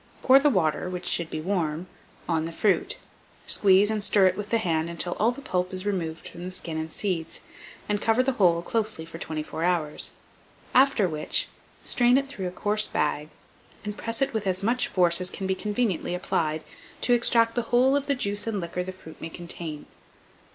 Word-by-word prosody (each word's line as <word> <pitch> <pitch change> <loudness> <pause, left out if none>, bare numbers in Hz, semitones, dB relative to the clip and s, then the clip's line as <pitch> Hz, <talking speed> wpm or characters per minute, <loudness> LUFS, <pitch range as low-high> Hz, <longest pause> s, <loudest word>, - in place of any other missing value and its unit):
Pour 265 +1 +7
the 295 +1 +3
water 180 - 0
(which 180 -1 -6
should 170 -2 -1
be 155 - -4
warm) 165 -2 -2 0.4
on 160 -2 0
the 165 - -3
fruit, 195 +3 0 0.5
squeeze 200 +1 +5
and 215 -2 -1
stir 200 -1 +5
it 185 0 +3
with 210 +1 -6
the 230 - +2
hand 165 -6 -1
until 170 +1 -2
all 220 - +3
the 275 +3 -6
pulp 180 -4 -2
is 185 +1 -4
removed 170 -5 -3
from 175 - -10
the 180 - -5
skin 175 -3 -5
and 160 0 -5
seeds, 180 -5 -2 0.5
and 210 0 -1
cover 225 +3 +2
the 270 - +1
whole 175 -8 +2
closely 215 -5 -2
for 165 0 -10
24 155 0 -5
hours; 170 -4 0 0.6
after 260 -6 +4
which, 155 -2 0 0.3
strain 245 +1 +4
it 275 - 0
through 200 -9 -5
a - - -5
coarse 210 +3 +3
bag, 150 0 -1 0.6
and 210 0 -4
press 230 +3 -2
it 270 - -2
with 215 -3 -2
as 185 +1 +1
much 240 +4 +1
force 175 -1 +4
as 180 - +5
can 195 - -6
be 190 - +1
conveniently 205 -3 -2
applied, 155 -3 -1 0.4
to 245 - +3
extract 230 -1 +3
the 240 - 0
whole 255 +3 +4
of 285 0 -1
the 280 - +1
juice 205 -3 -2
and 215 -3 -1
liquor 175 0 -4
the 185 +1 -5
fruit 185 -4 -14
may 165 - -5
contain. 170 -3 -7
185 Hz, 200 wpm, -26 LUFS, 170-220 Hz, 0.6 s, Pour